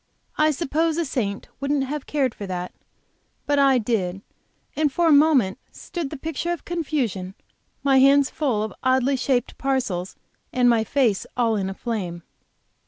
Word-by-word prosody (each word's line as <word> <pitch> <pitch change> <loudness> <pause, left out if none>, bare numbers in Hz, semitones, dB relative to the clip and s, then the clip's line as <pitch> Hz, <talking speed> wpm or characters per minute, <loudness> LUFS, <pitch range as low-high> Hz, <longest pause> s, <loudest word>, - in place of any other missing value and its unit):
I 305 0 +3
suppose 315 +2 0
a 340 - 0
saint 215 -8 -3
wouldn't 280 0 0
have 285 +1 -5
cared 270 -5 0
for 200 - -7
that, 180 -1 -4 0.7
but 290 0 +2
I 275 -2 +5
did, 200 -5 -1 0.5
and 300 -2 +1
for 345 +5 +1
a - - +5
moment 285 -10 +4
stood 340 -6 -5
the 300 - -6
picture 320 +4 -3
of 345 - -4
confusion, 260 - -2 0.5
my 270 -1 +4
hands 275 +1 +5
full 250 -9 0
of 220 - -5
oddly 260 +1 +2
shaped 255 -1 -1
parcels 240 -10 -1 0.4
and 250 -1 +3
my 230 -2 +4
face 230 -4 +1
all 230 -2 +2
in 195 -2 -1
a 190 - -6
flame. 185 -8 -4
265 Hz, 165 wpm, -23 LUFS, 215-290 Hz, 0.7 s, I